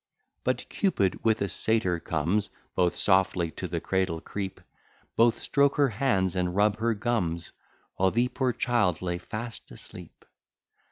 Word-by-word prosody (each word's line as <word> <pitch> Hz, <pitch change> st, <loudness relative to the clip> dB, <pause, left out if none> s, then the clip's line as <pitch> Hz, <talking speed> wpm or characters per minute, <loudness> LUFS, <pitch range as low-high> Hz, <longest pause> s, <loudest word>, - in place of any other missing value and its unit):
But -, -, -1 dB
Cupid 100 Hz, -, 0 dB
with 110 Hz, -2 st, +2 dB
a -, -, 0 dB
Satyr 95 Hz, -2 st, +1 dB
comes; 85 Hz, +7 st, 0 dB, 0.2 s
Both 90 Hz, -1 st, +2 dB
softly 95 Hz, -3 st, +2 dB
to 90 Hz, -, -5 dB
the 85 Hz, -1 st, -2 dB
cradle 95 Hz, -2 st, 0 dB
creep; 95 Hz, +2 st, -5 dB, 0.6 s
Both 115 Hz, 0 st, +4 dB
stroke 140 Hz, -1 st, +2 dB
her 140 Hz, -2 st, +3 dB
hands, 100 Hz, -6 st, +1 dB
and 90 Hz, -1 st, -1 dB
rub 105 Hz, +1 st, +3 dB
her 115 Hz, 0 st, +1 dB
gums, 100 Hz, -7 st, -1 dB, 0.5 s
While 95 Hz, 0 st, +4 dB
the 120 Hz, +5 st, +2 dB
poor 130 Hz, -1 st, 0 dB
child 110 Hz, -9 st, +1 dB
lay 90 Hz, -1 st, -2 dB
fast 115 Hz, +4 st, -7 dB
asleep. -, -, -10 dB
100 Hz, 150 wpm, -28 LUFS, 90-115 Hz, 0.6 s, Both